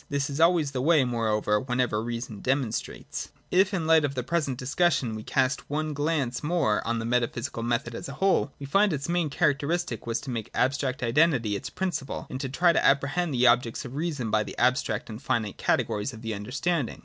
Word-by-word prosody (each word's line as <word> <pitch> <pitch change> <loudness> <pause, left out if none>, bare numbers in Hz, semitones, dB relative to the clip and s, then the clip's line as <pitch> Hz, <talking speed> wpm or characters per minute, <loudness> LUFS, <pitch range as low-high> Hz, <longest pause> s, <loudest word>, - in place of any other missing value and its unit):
This 140 0 -1
is 140 - -4
always 165 -4 +4
the 130 -2 -2
way, 155 -1 +4
moreover, 110 -3 +1
whenever 125 -3 0
reason 115 -2 -5
demonstrates. 130 -2 -2 0.2
If 190 +2 +4
in 185 -5 -1
the - - -3
light 160 -1 +5
of 140 -1 -1
the 125 - -2
present 140 -2 -1
discussion 135 -2 +1
we 110 - -5
cast 130 +4 0
one 155 +1 -2
glance 145 -5 -1
more 150 -9 +1
on 115 0 0
the 115 - -3
metaphysical 120 +1 -1
method 120 +1 -1
as 115 - -6
a - - -6
whole, 190 -2 +2
we 140 - -7
find 195 +6 +3
its 140 -1 -3
main 170 -2 0
characteristic 145 -2 0
was 115 0 0
to 135 - -6
make 115 -3 -4
abstract 130 -1 0
identity 120 -4 +2
its 130 +5 -5
prin 190 +4 -2
ciple 135 -4 -5
and 130 - -4
to 135 - -3
try 170 +6 +3
to - - +2
apprehend 140 +5 +2
the 125 +1 +3
objects 120 +2 +3
of 125 - -8
reason 145 -7 -2
by 110 - +3
the - - -6
abstract 120 -4 +1
and 110 +1 -8
finite 115 -7 -1
categories 105 +5 0
of 110 +1 -11
the 115 -1 -3
understanding. 125 - -2
135 Hz, 210 wpm, -27 LUFS, 120-155 Hz, 0.2 s, light